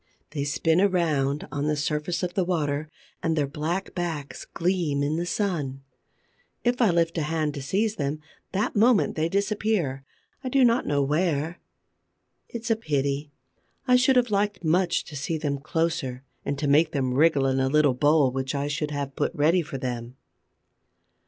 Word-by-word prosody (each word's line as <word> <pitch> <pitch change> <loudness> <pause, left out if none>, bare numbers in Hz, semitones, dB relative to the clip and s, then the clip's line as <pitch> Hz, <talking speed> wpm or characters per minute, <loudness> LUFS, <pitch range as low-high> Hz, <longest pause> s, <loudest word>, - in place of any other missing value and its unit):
They 145 -2 -2
spin 160 +4 +2
around 155 -7 +1
on 145 +1 -2
the 150 - +1
surface 150 +4 -2
of 175 -1 -2
the 190 - +1
water 155 -4 -1 0.3
and 160 -1 0
their 150 -2 +1
black 160 +7 -3
backs 165 -6 -4
gleam 170 -5 0
in 150 +2 0
the 175 +1 -2
sun. 150 -11 -2 0.8
If 245 +1 +1
I 225 - +5
lift 170 -1 +1
a - - 0
hand 155 -1 -1
to 140 - -5
seize 210 +10 0
them, 145 0 -2 0.3
that 200 +3 -1
moment 225 +1 +4
they 160 +1 0
disappear, 200 -8 0 0.4
I 255 - -2
do 265 0 +4
not 235 +1 +2
know 140 -1 +2
where. 155 +2 0 0.9
It's 230 0 -4
a - - +5
pity; 145 -6 -2 0.6
I 250 - +6
should 255 +1 +4
have 245 -3 +3
liked 205 -2 0
much 170 +2 +2
to 150 - -11
see 155 +3 -2
them 145 -3 -2
closer 140 -4 -2 0.2
and 140 - -2
to 145 - -1
make 155 +3 +4
them 130 -3 0
wriggle 145 0 +4
in 135 0 +1
a 130 0 +2
little 150 -1 +4
bowl 145 +1 +3
which 130 +1 -3
I 140 +1 -1
should 150 +1 -2
have 140 -2 -4
put - - 0
ready 165 +5 +3
for 145 -4 -6
them. 125 -1 -5
155 Hz, 180 wpm, -26 LUFS, 140-180 Hz, 0.9 s, I